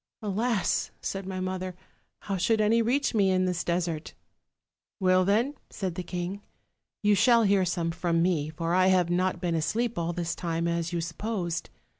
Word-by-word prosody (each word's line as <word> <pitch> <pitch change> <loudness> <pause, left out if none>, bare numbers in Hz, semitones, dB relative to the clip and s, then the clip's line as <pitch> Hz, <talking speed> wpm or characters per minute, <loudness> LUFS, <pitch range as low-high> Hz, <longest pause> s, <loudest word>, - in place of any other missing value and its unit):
" - - -66
'Alas!' 215 +1 0
said 195 -1 -4
my 190 -1 -4
mother, 185 -1 -3 0.5
'how 200 - -3
should 215 +5 +2
any 220 +2 +4
reach 255 +5 +1
ma 215 - +3
in 185 -1 +3
this 180 -2 -1
desert?' 170 -2 -2 0.4
" - - -65
'Well, 185 -1 +4
then,' 225 +8 +2 0.2
said 190 -4 -3
the 180 - -4
king, 180 +3 -4 0.6
'you 210 0 +5
shall 235 +2 +5
hear 195 -2 +3
some 170 -1 -1
from 170 0 0
me; 165 -4 +1
for 165 +2 -2
I 185 +1 +4
have 180 -2 +3
not 185 0 +1
been 175 -1 -1
asleep 215 +8 0
all 170 0 -1
this 170 -1 -2
time 170 -1 -2
as 170 0 -1
you 170 -1 -1
supposed. 175 +1 -3
185 Hz, 185 wpm, -28 LUFS, 170-200 Hz, 0.6 s, you